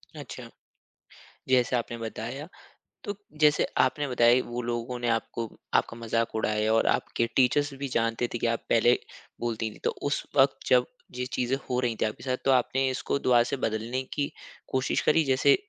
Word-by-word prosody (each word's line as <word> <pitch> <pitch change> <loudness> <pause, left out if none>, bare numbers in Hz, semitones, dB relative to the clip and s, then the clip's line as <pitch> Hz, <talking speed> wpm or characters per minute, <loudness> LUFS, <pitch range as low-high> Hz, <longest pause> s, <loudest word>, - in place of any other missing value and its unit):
अच्छा। - - -8 1.0
जैसे 125 -1 +3
आपने 120 0 -3
बताया 115 +7 -5 0.6
तो, 205 - -4 0.2
जैसे 150 -1 +4
आपने 145 -1 +2
बताया 125 0 +4
वो 120 +1 -4
लोगों 120 +1 -3
ने 120 - -2
आपको 115 0 -1 0.3
आपका 115 - +1
मज़ाक 115 0 -1
उड़ाया 110 0 +1
और 115 - +3
आपके 115 - +1
टीचर्स 140 +2 +3
भी 140 - -2
जानते 115 +1 +1
थे 120 - -1
कि 120 - +1
आप 115 0 0
पहले 120 +1 +5 0.5
बोलती 115 -1 -2
थी। - - -15
तो - - +2 0.2
उस 145 - -1
वक़्त, 135 +1 +5
जब 125 -1 +5 0.3
ये 125 0 -2
चीज़ें 125 0 -1
हो 125 0 +1
रही 120 -2 0
थीं - - +4
आपके 110 - -7
साथ 130 -1 -1
तो 135 - +4
आपने 130 +1 +2
इसको 130 +2 -1
दोबारा 120 -3 +4
से 140 - 0
बदलने 115 +4 -2
की 145 -1 -1 0.4
कोशिश 130 0 +1
करी 160 +1 +4
जैसे 130 - +4
125 Hz, 180 wpm, -27 LUFS, 115-130 Hz, 1.0 s, पहले